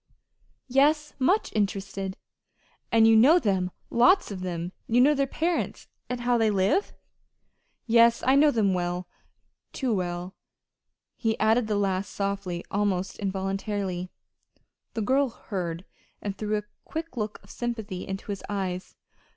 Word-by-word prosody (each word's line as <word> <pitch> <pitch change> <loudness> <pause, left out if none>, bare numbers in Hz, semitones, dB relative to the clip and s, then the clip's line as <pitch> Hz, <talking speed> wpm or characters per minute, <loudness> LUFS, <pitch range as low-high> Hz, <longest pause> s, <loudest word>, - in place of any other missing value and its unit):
"Yes, 295 +4 +3
much 365 +11 +2
interested." 195 -2 -2 0.7
"And 225 -1 +6
you 225 - +6
know 270 +10 +7
them 190 - +1 0.2
lots 350 - +4
of 190 -2 -5
them? 175 -1 -3 0.2
You 235 +2 +3
know 280 +4 +6
their 275 -1 +1
parents, 335 +5 -2 0.2
and 250 -1 -3
how 240 0 +2
they 220 -1 +3
live?" 205 - +1 0.9
"Yes, 235 0 +5
I 260 - +5
know 290 +2 +6
them 215 -7 +2
well 180 0 -2 0.7
too 255 -4 -1
well." 180 -1 -3 0.8
He 225 -2 0
added 220 +1 +3
the 210 -1 0
last 195 -1 0
softly, 195 -3 -2
almost 195 -2 -1
involuntarily. 195 -1 -2 0.9
The 225 - -1
girl 270 +4 +2
heard, 180 -6 -5 0.3
and 200 -1 -4
threw 215 +1 -1
a 210 - -4 0.2
quick 330 -1 -6
look 215 -2 -3
of - - -14
sympathy 220 -6 -4
into 195 +2 -5
his 200 - -4
eyes. 190 -3 -3
210 Hz, 140 wpm, -27 LUFS, 190-240 Hz, 0.9 s, know